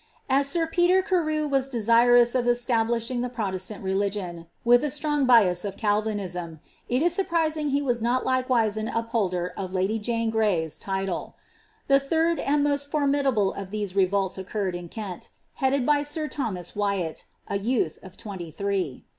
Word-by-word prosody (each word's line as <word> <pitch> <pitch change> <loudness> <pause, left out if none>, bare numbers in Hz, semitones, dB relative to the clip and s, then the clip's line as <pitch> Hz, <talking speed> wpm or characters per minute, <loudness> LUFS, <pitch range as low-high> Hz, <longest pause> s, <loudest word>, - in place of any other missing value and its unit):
As 275 +1 +3
sir 335 +2 +1
Peter 350 +3 +3
Carew 310 -5 0
was 270 -1 0
desirous 240 0 +4
of 250 -2 +1
establishii^ 240 0 +1
the 250 - -2
Protestant 200 -4 -4
religion, 190 -3 -2 0.2
with 245 +2 +5
a 300 - 0
strong 295 -1 0
bias 195 -8 +5
of 200 -1 -5
Calvinism, 200 -6 -2 0.3
it 250 +5 +1
is 345 0 +2
sniprisHig 320 -5 0
he 280 +1 +1
was 245 -4 0
not 245 +3 +1
likewise 250 -5 +1
an 215 0 -2
upholder 205 -7 -1
of 190 -1 -5
lady 195 +4 0
Jane 230 +1 -1
Gray^s 200 -8 0
title. 190 -2 -3 0.5
The 275 0 +5
third 325 +4 +1
and 285 +1 +1
most 285 -1 0
formidable 275 -8 +1
of 195 -1 -7
these 205 -2 -4
revolts 195 0 +1
occurred 190 0 -3
in 175 -1 -6
Kent, 200 -4 -7 0.3
headed 265 -1 +2
by 295 +1 +4 0.2
m 305 -1 -2
Thomas 190 - -3
Wyati, 200 -5 -2 0.2
a 200 - -1
youth 210 -7 -1
of 190 -1 -13
twenty 190 -6 -7
three. 185 -4 -3
230 Hz, 165 wpm, -25 LUFS, 195-275 Hz, 0.5 s, with